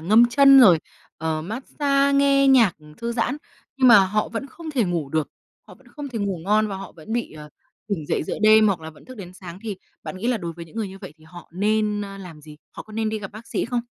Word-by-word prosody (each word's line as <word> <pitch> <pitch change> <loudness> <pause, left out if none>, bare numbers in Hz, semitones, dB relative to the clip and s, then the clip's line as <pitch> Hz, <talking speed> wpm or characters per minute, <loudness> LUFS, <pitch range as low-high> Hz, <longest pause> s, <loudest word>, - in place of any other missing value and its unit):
ngâm 215 +8 +5
chân 275 +2 +7
rồi, 185 -9 +7 0.4
ờ, 160 -1 -2
massage, 275 - 0
nghe 275 0 +4
nhạc, 240 -8 +5
ừm, 150 0 -17
thư 235 +7 -4
giãn. 240 +3 -1 0.4
Nhưng 260 -2 +4
mà 235 - +9
họ 210 +2 -1
vẫn 230 +4 -5
không 320 +4 -9
thể 260 -7 +1
ngủ 170 -6 -2
được, 155 +1 -1 0.4
họ - - -14
vẫn - - -25
không 290 -2 -8
thể 240 -4 -5
ngủ 200 -3 -2
ngon 215 +2 +2
và 195 - -5
họ 195 +1 -9
vẫn 165 +5 -10
bị, 235 0 -2
ờ, 150 -1 -11 0.4
tỉnh 170 -8 -3
dậy - - -1
giữa - - -5
đêm 215 0 +6
hoặc 195 -5 0
là 160 0 -8
vẫn 155 - -19
thức 255 - -12
đến 180 -4 -9
sáng. 185 -1 -11
Thì 215 -4 -5 0.3
bạn - - -7
nghĩ 195 +5 -4
là 250 - +1
đối 170 -5 -5
với 170 +1 -10
những 165 - -17
người 220 -3 -2
như 190 +1 -11
vậy 150 - -11
thì 155 - -22
họ 175 +2 -13
nên, 210 +2 0
ơ, 195 -1 -8
làm 175 -5 -11
gì? 150 0 -13
Họ - - -9
có 215 - -16
nên 220 0 -1
đi 220 0 -3
gặp 195 -2 -8
bác 215 +3 -11
sĩ - - -2
không? 240 0 -2
210 Hz, 270 wpm, -23 LUFS, 175-235 Hz, 0.4 s, mà